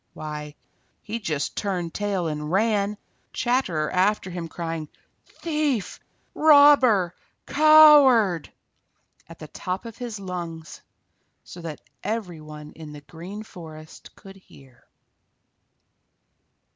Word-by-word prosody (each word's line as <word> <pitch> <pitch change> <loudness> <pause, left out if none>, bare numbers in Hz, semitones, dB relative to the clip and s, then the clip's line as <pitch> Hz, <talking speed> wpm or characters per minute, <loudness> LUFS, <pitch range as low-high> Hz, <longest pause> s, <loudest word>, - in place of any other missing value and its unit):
Why, 150 -1 -7 0.5
he 225 +2 -5
just 155 -9 -3
turned 180 -5 -3
tail 200 -4 -2
and 150 0 -4
ran, 205 0 +1 0.4
Chatterer 185 -12 0
after 190 0 +1
him, 175 -1 -5
crying 165 -2 -5 0.4
"Thief! 300 - -2 0.3
Robber! 285 - +5 0.3
Coward!" 285 - +6 0.8
at 165 - -12
the 155 - -10
top 185 +7 -5
of 230 0 -10
his 235 -4 -6
lungs, 170 -4 -7 0.6
so 175 - -11
that 160 -3 -7 0.2
every 190 -8 -4
one 150 0 -11
in 155 -2 -11
the 145 - -10
Green 180 +8 -9
Forest 160 -6 -13
could 195 -1 -14
hear. 135 -9 -20
185 Hz, 105 wpm, -24 LUFS, 160-225 Hz, 0.8 s, Coward